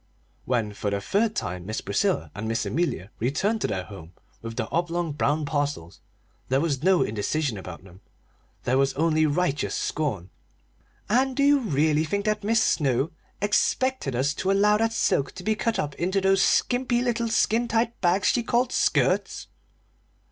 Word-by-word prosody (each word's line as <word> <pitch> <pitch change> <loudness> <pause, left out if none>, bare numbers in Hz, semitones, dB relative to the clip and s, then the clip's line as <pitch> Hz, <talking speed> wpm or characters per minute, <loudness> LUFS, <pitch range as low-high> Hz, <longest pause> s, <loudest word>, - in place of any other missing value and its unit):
When 115 -5 -1
for 105 0 -3
the 100 0 -1
third 210 - 0
time 90 -3 -4
Miss 110 - -3
Priscilla 75 -1 -1
and 105 +3 -5
Miss 115 +1 -1
Amelia 150 - -2
returned 190 - 0
to - - +1
their 95 - -3
home 90 -4 -12 0.3
with 115 0 -7
the 115 -2 -2
oblong 170 -1 -1
brown 150 +1 0
parcels 145 - -3 0.5
there 130 +1 +2
was 140 -4 -1
no 185 +1 +4
indecision 115 +5 -1
about 90 -2 -9
them; 95 0 -16 0.6
there 130 +2 +1
was 135 0 +1
only 155 0 +2
righteous 150 -1 0
scorn. 105 - -2 0.8
"And 255 +5 +2
do 280 - +1
you 285 0 +5
really 155 - +1
think 200 +6 -2
that 215 -1 0
Mis' 220 +2 +2
Snow 135 0 +1 0.3
expected 210 - +1
us 135 +4 +1
to 190 - -3
allow 210 +2 +4
that 225 +1 +1
silk 140 -10 0
to 180 - -9
be 220 - +1
cut 225 +1 -1
up 145 -1 -2
into 185 +6 0
those 195 0 +3
skimpy 245 +2 +2
little 235 -2 -1
skin 225 +1 +2
tight 235 0 -1
bags 180 +2 +2
she 240 - +2
called 240 +2 0
skirts?" - - +1
155 Hz, 170 wpm, -25 LUFS, -, 0.8 s, you